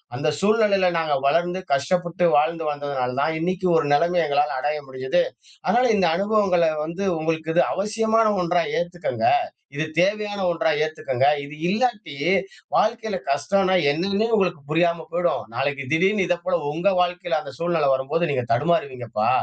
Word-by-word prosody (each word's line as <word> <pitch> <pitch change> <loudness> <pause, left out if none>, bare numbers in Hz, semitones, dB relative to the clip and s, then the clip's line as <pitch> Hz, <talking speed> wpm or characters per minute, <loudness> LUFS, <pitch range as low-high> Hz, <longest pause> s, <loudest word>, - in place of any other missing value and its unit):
அந்த 150 +5 0
சூழ்நிலையில 200 -3 +3
நாங்க 160 -3 0
வளர்ந்து 175 +5 +1
கஷ்டப்பட்டு 175 +5 0
வாழ்ந்து 160 +2 0
வந்ததனால 140 -3 -3
தான் 160 +2 0
இன்னைக்கு 185 +2 -1
ஒரு 160 -3 0
நெலமை 170 +4 +2
எங்களால 145 -1 0
அடைய 150 0 -2
முடிஞ்சுது. 130 +7 0 0.4
அதனால 245 +1 +3
இந்த 180 -3 +3
அனுபவங்கள 195 -5 +2 0.2
வந்து 180 +5 -4
உங்களுக்கு 160 0 -2
இது 175 - +5
அவசியமான 220 +2 +1
ஒன்றா 175 -1 +1 0.2
ஏத்துக்கங்க 175 - -3 0.5
இது 155 - -1
தேவையான 205 +2 +1
ஒன்றா 165 -1 0
ஏத்துக்கங்க 135 -4 -1 0.2
இது 140 +1 -9
இல்லாட்டி 210 - -1 0.6
வாழ்க்கையில 220 -2 0
கஷ்டம்னா 185 +8 +1 0.2
என்னன்னு 195 +8 0
உங்களுக்கு 180 -7 0
புரியாம 170 +1 +1
போயிடும். 175 -8 0
நாளைக்கு 135 +1 -1
திடீர்னு 190 +5 +2
இத 175 - +2
போல, 185 -1 +1 0.2
உங்க 170 +6 -1
வாழ்க்கையில 175 -2 -1
அந்த 140 - -9
சூழ்நிலை 165 -4 +1
வரும்போது 150 +6 -1
நீங்க 125 -3 -1
தடுமாறுவீங்கப்பா 125 -6 0
170 Hz, 140 wpm, -23 LUFS, 145-190 Hz, 0.6 s, இது